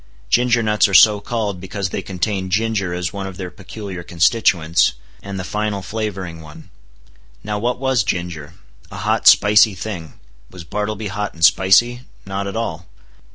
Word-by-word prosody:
Ginger 120 -1 +3
nuts 105 -1 +3
are 100 - -1
so 105 +4 +7
called 105 -4 -3
because 95 0 -4
they - - -3
contain 95 0 -3
ginger 105 -2 0
as 90 -1 -3
one 100 -1 -5
of 95 -2 -9
their 90 -2 -6
peculiar 95 0 -8
constituents, 85 -1 +2 0.3
and 100 -1 -6
the - - -4
final 105 0 -3
flavoring 95 -6 -5
one. 75 -1 -14 0.7
Now 105 0 -3
what 120 +3 -1
was 130 -4 +1
ginger? 85 -4 -4 0.3
A - - -9
hot, - - 0
spicy 105 0 +6
thing. 90 -6 -6 0.4
Was 90 -2 -11
Bartleby 105 +4 -4
hot 105 +1 -4
and 80 0 +4
spicy? 105 +8 +4 0.2
Not 100 +1 -4
at 100 - -5
all. 90 -7 -4
100 Hz, 160 wpm, -19 LUFS, 90-105 Hz, 0.7 s, so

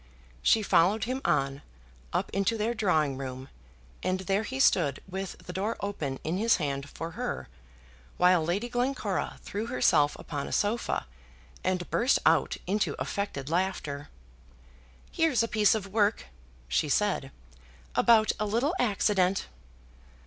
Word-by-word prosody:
She 220 - +4
followed 200 +3 +3
him 255 +3 -2
on, 135 +1 +1 0.5
up - - -1
into 200 +4 +1
their 220 +2 0
drawing 160 - +1
room, 130 0 -6 0.5
and 185 0 -1
there 195 +2 +1
he 260 +5 -5
stood 155 - +3
with 190 0 -5
the 180 - -10
door 205 +5 -2
open 155 -10 -3
in 165 +3 -1
his 230 +3 +4
hand 140 -3 -3
for 165 +1 -6
her, - - -4 0.7
while 180 -2 +5
Lady 185 +8 -1
Glencora 245 -5 -1
threw 210 +3 -4
herself 150 -11 +3
upon 145 -3 -5
a - - -7
sofa, 210 - 0 0.6
and 185 -2 -1
burst 250 +3 +3
out - - +3
into 205 +3 0
affected 170 -10 -3
laughter. 160 -4 -2 1.0
"Here's 300 -9 +2
a - - 0
piece 215 -1 +3
of 210 -3 -3
work," 210 -1 +2 0.4
she 70 - 0
said, 190 -5 +1 0.7
"about 220 -2 +5
a 210 - 0
little 240 - +1
accident." 200 -4 +2
195 Hz, 140 wpm, -28 LUFS, 160-220 Hz, 1.0 s, while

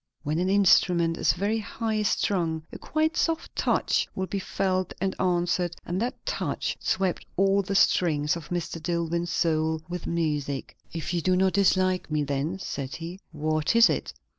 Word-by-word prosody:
When 155 +2 -1
an 185 +1 +1
instrument 180 -4 +4
is - - +3
very 205 +5 0
high 220 0 -2
strung, 170 -6 0
a - - -7
quite 315 +1 0
soft 330 -1 -1
touch - - +1
will 190 - -1
be 195 +1 -3
felt 185 -1 -1
and 190 +1 0
answered, 175 -1 +1
and 180 +3 -2
that 245 +2 -3
touch - - -2
swept 190 -2 0
all 195 +1 +4
the 195 +1 -3
strings 155 -6 +3
of 170 -3 -8
Mr. 170 -2 -3
Dillwyn's 170 +1 -1
soul 160 -2 0
with 175 -1 -5
music. 150 -5 -2 0.2
"If 165 +1 -4
you 170 - 0
do 185 +2 +2
not 190 0 +2
dislike 185 -2 +2
me, 150 -1 0
then," 145 +6 -2
said 140 -8 -5
he, 170 +3 -7
"what 155 +3 0
is 230 0 +7
it? - - -2
175 Hz, 170 wpm, -26 LUFS, 160-195 Hz, 0.2 s, is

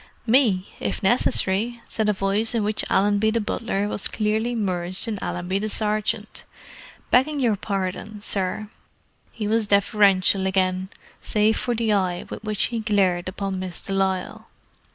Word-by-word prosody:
"Me, 220 -6 +3
if - - -3
necessary," 220 +2 +1
said 215 -1 0
a - - +5
voice 200 +4 0
in 225 - +1
which 210 +1 +1
Allenby 205 +2 +3
the 230 +1 +1
butler 205 -1 -2
was 205 - 0
clearly 220 +3 -1
merged 185 -2 -2
in 215 -3 -3
Allenby 180 +2 -2
the 215 +1 -2
sergeant. 215 0 0 0.7
"Begging 285 +4 +3
your 235 -5 +2
pardon, 200 +1 -4
sir." 205 +1 -3 0.6
He 215 -2 -4
was 220 0 +1
deferential 200 -2 +3
again—save 190 +3 -1
for 240 -1 -1
the 225 -2 +1
eye 185 -3 0
with - - -7
which 215 -2 -1
he 230 - 0
glared 190 -5 +1
upon 195 0 -4
Miss 185 -2 -5
de 195 - -5
Lisle. 190 -1 -1
205 Hz, 150 wpm, -23 LUFS, 190-220 Hz, 0.7 s, a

